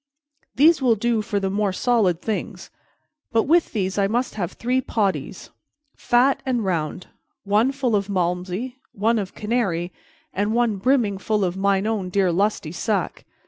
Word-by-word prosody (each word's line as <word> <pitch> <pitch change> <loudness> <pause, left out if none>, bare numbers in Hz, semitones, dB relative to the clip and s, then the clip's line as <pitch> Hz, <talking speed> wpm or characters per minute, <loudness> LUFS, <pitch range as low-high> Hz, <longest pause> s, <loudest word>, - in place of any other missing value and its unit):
These 305 +5 +5
will 245 -3 +4
do 230 +1 0
for 205 -1 -2
the 195 -1 -2
more 205 0 0
solid 190 -5 +1
things; 220 -2 -4 0.6
but 225 -1 +3
with 335 +3 +2
these 190 -1 -1
I 195 - +3
must 240 +4 -1
have 180 -5 -4
three 255 +2 0
potties, 190 - -2 0.4
fat 250 +3 +2
and 245 -5 -1
round, 170 -1 -2 0.4
one 210 +6 +2
full 265 -5 0
of 200 0 -1
Malmsey, 185 +6 -2 0.2
one 220 +3 +1
of 195 -2 -5
Canary, 195 -6 -1 0.4
and 205 +4 0
one 235 -4 +1
brimming 225 -3 +1
full 210 -1 0
of 180 0 -2
mine 195 0 +1
own 215 -4 -1
dear 190 -1 +2
lusty 190 -3 0
sack." 195 +1 -2
205 Hz, 160 wpm, -22 LUFS, 190-235 Hz, 0.6 s, These